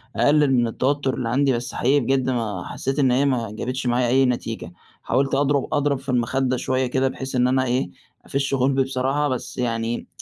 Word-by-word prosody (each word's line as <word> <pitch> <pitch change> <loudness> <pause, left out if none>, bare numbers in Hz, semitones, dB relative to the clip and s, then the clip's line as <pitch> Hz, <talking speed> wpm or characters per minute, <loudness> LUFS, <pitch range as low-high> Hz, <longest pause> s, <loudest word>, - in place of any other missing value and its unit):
أقلل 145 +5 +3
من 120 -2 +3
التوتر 135 +3 0
اللي 120 -2 -3
عندي، 135 +2 +2
بس 120 0 -4
حقيقي 135 +4 +2
بجد، 130 0 0
ما 110 -7 -2
حسيت 135 +2 -3
إن 135 -3 +3
هي 130 +3 +2
ما 120 -6 0
جابتش 125 +4 -4
معايا 120 0 +2
أي 130 +2 +4
نتيجة، 115 -7 -3 0.3
حاولت 135 +2 +1
أضرب 140 0 +1
أضرب 145 -2 +1
في 135 +1 -11
المخدة 130 +1 0
شوية 130 +1 0
كده، 130 +2 +1
بحيث 130 0 -5
إن 125 0 +3
أنا 130 0 +2
إيه، 125 -6 0 0.4
أفش 140 0 -2
غُلبي 135 0 +2
بصراحة، 135 +3 0
بس 130 -2 -4
يعني 115 -1 -2
130 Hz, 195 wpm, -22 LUFS, 120-135 Hz, 0.4 s, أي